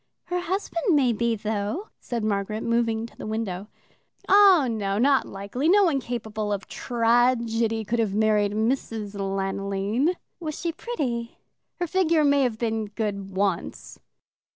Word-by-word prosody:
"Her 355 0 -2
husband 355 -1 0
may 260 -5 +3
be, 235 +1 0
though," 215 - -3
said 235 -3 -4
Margaret, 215 +1 -1
moving 230 -1 +1
to 235 - -13
the - - -7
window. 210 -3 -3 0.6
"Oh, 385 -7 +7
no, 205 -4 -1
not 270 +4 +3
likely. 200 +10 -2
No 405 +2 +6
one 320 -7 +2
capable 220 -4 -4
of 200 -1 -3
tragedy 230 -2 +1
could 235 +3 -1
have 210 -3 0
married 210 -1 +2
Mrs. 220 -2 -1
Lanoline." 195 - -1 0.2
"Was 310 -3 -5
she 340 - -1
pretty?" 260 - -4 0.4
"Her 350 - 0
figure 335 -3 +2
may 285 -1 +4
have 245 -4 0
been 225 -2 -1
good 200 -2 -4
once." 195 -2 -2
230 Hz, 145 wpm, -25 LUFS, 210-275 Hz, 0.6 s, Oh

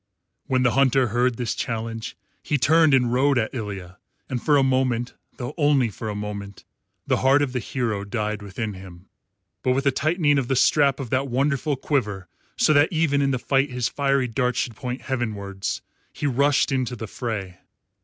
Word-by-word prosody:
When 130 -1 +2
the 125 - +3
Hunter 130 -1 +3
heard 120 +1 +1
this 120 -3 -1
challenge 115 0 -4 0.2
he 150 - 0
turned 155 +1 +5
and 125 -2 +2
rode 135 +2 +3
at 110 -2 0
Ilya, 100 -7 -6 0.3
and 125 -3 -2
for 150 -2 +3
a 135 - +4
moment, 130 -2 +1 0.2
though 125 +3 -5
only 145 -5 +3
for 110 +2 -6
a 105 - -4
moment, 100 -1 -6 0.4
the - - +1
heart 135 +2 +4
of 130 -3 -3
the 125 - 0
hero 115 -4 -2
died 105 +1 -3
within 105 +2 -4
him. 95 -1 -12 0.5
But 130 - +2
with 135 +2 -1
a 140 - +4
tightening 150 0 +2
of 130 - -2
the 135 - +1
strap 140 +1 +3
of 130 -5 -6
that 130 +2 +1
wonderful 140 +3 0
quiver, 105 -9 -2 0.3
so 155 - +4
that 145 +1 +5
even 155 -4 +2
in 140 - +2
the 135 - +1
fight 135 +3 +1
his 125 -1 -1
fiery 140 -2 +1
darts 125 +1 -1
should 120 - -2
point 125 +3 -5
heavenwards, 105 -7 -3 0.3
he - - -5
rushed 140 +2 +2
into 130 -2 -1
the 110 - -6
fray. 100 -6 -5
125 Hz, 190 wpm, -24 LUFS, 110-140 Hz, 0.5 s, turned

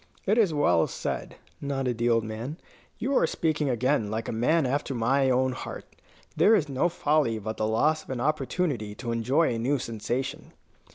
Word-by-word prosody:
"It 210 +4 +3
is 205 -7 +4
well 90 - +3
said," - - -4 0.3
nodded 135 -4 -2
the 120 +1 +2
old 115 -1 +3
man; 115 +8 -5 0.4
"you 270 +4 -1
are 165 - +4
speaking 155 -4 0
again 125 -2 +1
like 110 +2 -3
a - - -2
man 135 +8 +2
after 135 +1 -1
my 130 +4 +2
own 130 +1 +2
heart. 130 - -7 0.5
There 225 - +5
is 165 -8 +1
no 140 +5 +1
folly 150 -8 +1
but 110 +1 -5
the 110 - 0
loss 150 +8 +2
of - - -20
an 130 -2 -3
opportunity 140 - -1
to 120 0 -4
enjoy 125 +6 +2
a 115 - -3
new 135 +5 +1
sensation." 130 +5 -4
130 Hz, 185 wpm, -27 LUFS, 115-155 Hz, 0.5 s, There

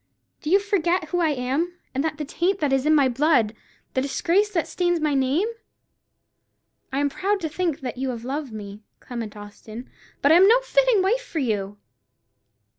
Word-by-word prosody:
Do 305 - -4
you 390 +4 +5
forget 365 -5 0
who 355 - 0
I 330 -2 +2
am, 285 +6 -1 0.2
and 270 +1 -1
the 310 -1 -3
taint 355 +6 0
that 295 -6 0
is 270 +2 +1
in 310 - +5
my 280 -3 +5
blood; 255 -4 +2 0.4
the 260 - +1
disgrace 345 +9 +1
that 350 -6 -1
stains 350 -1 0
my 305 -2 0
name? 275 +9 +1 1.4
I 265 - -2
am 285 +1 +2
proud 395 +8 -1
to 320 - -2
think 325 -2 -2
that 250 -1 -5
you 265 0 -1
have 235 -2 -5
loved 280 0 -4
me, 205 -1 -8 0.2
Clement 230 -4 -7
Austin; 215 +3 -10 0.3
but 285 - +5
I 325 - +8
am 380 +2 +7
no 470 +4 +6
fitting - - +3
wife 455 +6 +1
for - - -8
you!" 205 -7 -1
300 Hz, 190 wpm, -24 LUFS, 255-355 Hz, 1.4 s, I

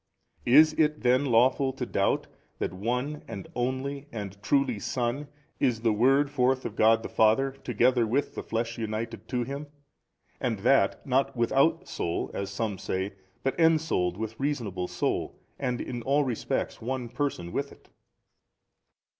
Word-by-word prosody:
Is 155 +5 +7
it 150 -1 +2
then 125 +3 +3
lawful 130 +2 +3
to - - -4
doubt - - +1 0.3
that - - -2
One 125 +9 -2
and 95 - -7
Only 130 +3 -2
and 100 -3 -6
Truly 135 -2 +1
Son 125 +6 -2 0.3
is 115 -3 +1
the 115 -2 +3
Word 135 +6 +3
forth 130 -1 +1
of 110 - -4
God 115 +1 +4
the - - -3
Father 110 +5 +3
together 125 -2 +1
with 135 +6 0
the - - -4
flesh 115 +1 -3
united 115 +1 -4
to 125 0 -1
Him 140 +4 -5 0.7
and 120 -5 -1
that 135 +6 +3
not 135 -1 +1
without 135 +9 +2
soul, 85 - -2
as 100 - -3
some 100 -1 -3
say, 95 +1 -2 0.3
but 135 - +1
ensouled 160 - +2
with 110 +1 -5
reasonable 115 -11 -2
soul - - -2 0.2
and 125 -3 -1
in 120 -1 -4
all 140 +4 +2
respects 125 -5 -2
One 125 +1 -3
Person 120 -9 -3
with 140 +6 -2
it? - - -18
125 Hz, 155 wpm, -28 LUFS, 110-135 Hz, 0.7 s, Is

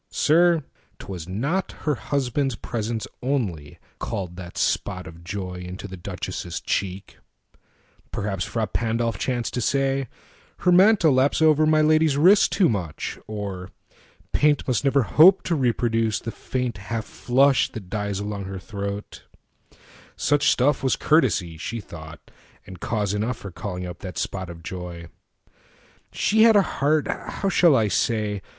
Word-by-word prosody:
Sir, 170 0 +3 0.3
'twas 90 -4 -7
notHer 150 - -2
husband's 135 0 -1
presence 115 0 -3 0.2
only, 100 - -2 0.2
called 90 -3 -4
that 90 -1 -9
spotOf 90 -4 -2
joy 90 0 -5
into 90 +3 -7
the 95 - -8
Duchess' 85 -1 -5
cheek: 95 0 -3 0.9
perhapsFrà 100 +2 -3
Pandolf 115 -1 -1
chanced 120 -3 -2
to 125 - -1
say, 135 +1 0 0.5
"Her 180 - +3
mantle 185 -4 +5
lapsOver 155 +3 +4
my 155 0 +4
lady's 155 -1 +3
wrist 185 +7 +5
too 190 -4 +3
much," 90 -9 -3
or 100 -3 -5 0.6
"PaintMust 145 -5 +2
never 140 -1 +3
hope 175 - +6
to 175 - -1
reproduce 115 -5 +1
the 115 - -5
faintHalf 115 -4 -4
flush 130 +4 +2
that 105 -5 -8
dies 105 -2 -2
along 100 -1 -4
her 95 0 -6
throat:" 100 +2 -6 0.9
such 145 -1 +2
stuffWas 130 0 +2
courtesy, 105 - +2
she 115 +7 -4
thought, 85 -4 -11 0.3
and 95 -2 -11
cause 105 -2 -1
enoughFor 110 -2 -3
calling 90 -2 -5
up 90 -1 -8
that 90 -4 -7
spot 95 -2 -3
of 85 -1 -10
joy. 85 -1 -7 1.0
She 220 - +1
hadA 220 -3 +7
heart—how 155 +6 -1
shall 170 -6 +5
I 110 -4 +3
say? 105 +1 0
115 Hz, 130 wpm, -24 LUFS, 95-140 Hz, 1.0 s, hadA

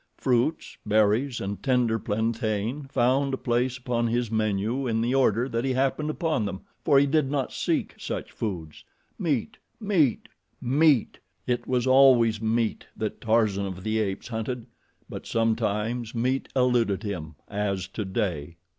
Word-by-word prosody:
Fruits, 130 +5 0
berries, 110 +5 +2
and 100 +1 -4
tender 125 -4 +2
plantain 110 +5 -2
found 135 +1 +2
a - - -9
place 125 +1 0
upon 120 -2 -1
his 120 -1 -1
menu 110 +4 0
in 115 -1 0
the 120 +3 0
order 125 -2 +3
that 115 -2 -2
he 130 -1 0
happened 135 +4 0
upon 155 - 0
them, 95 -2 -4 0.2
for 145 -4 +4
he 140 - +6
did 145 -1 +1
not 140 -2 -1
seek - - -1
such - - -5
foods. 85 -8 -5 0.4
Meat, - - -1 0.2
meat, 180 - +1 0.3
meat! 140 -1 +2 0.3
It 120 -1 -1
was 125 -1 +1
always 130 -4 +5
meat 115 0 0
that 110 -1 -4
Tarzan 110 -3 +2
of 95 -1 -7
the 110 +1 0
Apes 100 0 -3
hunted; 115 +1 -4 0.4
but - - -8
sometimes 115 +1 -1
meat 130 +3 0
eluded 120 -5 +2
him, 80 -7 -5
as 100 -2 -2
today. 95 -6 -3
115 Hz, 145 wpm, -26 LUFS, 105-130 Hz, 0.4 s, he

